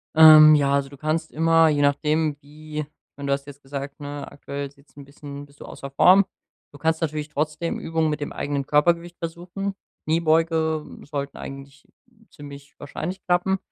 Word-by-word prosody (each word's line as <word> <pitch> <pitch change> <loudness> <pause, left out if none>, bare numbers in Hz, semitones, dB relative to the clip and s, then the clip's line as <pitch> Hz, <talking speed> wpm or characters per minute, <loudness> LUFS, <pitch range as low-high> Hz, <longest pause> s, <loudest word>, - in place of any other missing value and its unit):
Ähm, 155 -1 +10
ja, 140 -2 +2
also 140 -1 0
du 140 - -12
kannst 155 +2 -2
immer, 165 +1 +4
je 150 -2 +1
nachdem 150 +1 +1
wie 150 +1 -8
ich 150 0 -12
meine, 140 0 -6
du - - +1
hast 140 0 -2
jetzt 145 0 -12
gesagt, 140 +1 -7
ne, 145 0 -7
aktuell 140 0 -6
sieht's 140 +1 -26
’n 140 - -10
bisschen 140 0 -10
bist 145 0 -24
du - - -9
außer 140 - -9
Form. 185 +8 +6 0.5
Du 145 - -13
kannst 160 +2 0
natürlich 155 -2 -3
trotzdem 155 +2 -2
Übungen 160 -1 -1
mit 150 0 -3
dem 145 - -4
eigenen 140 -1 -3
Körpergewicht 170 +4 +1
versuchen. 175 +4 -5 0.3
Kniebeugen 160 -1 0
sollten 140 -1 -5
eigentlich 135 0 -10 0.4
ziemlich 145 -2 -12
wahrscheinlich 175 +6 -6
klappen, 180 +2 +1
150 Hz, 175 wpm, -23 LUFS, 140-160 Hz, 0.5 s, Ähm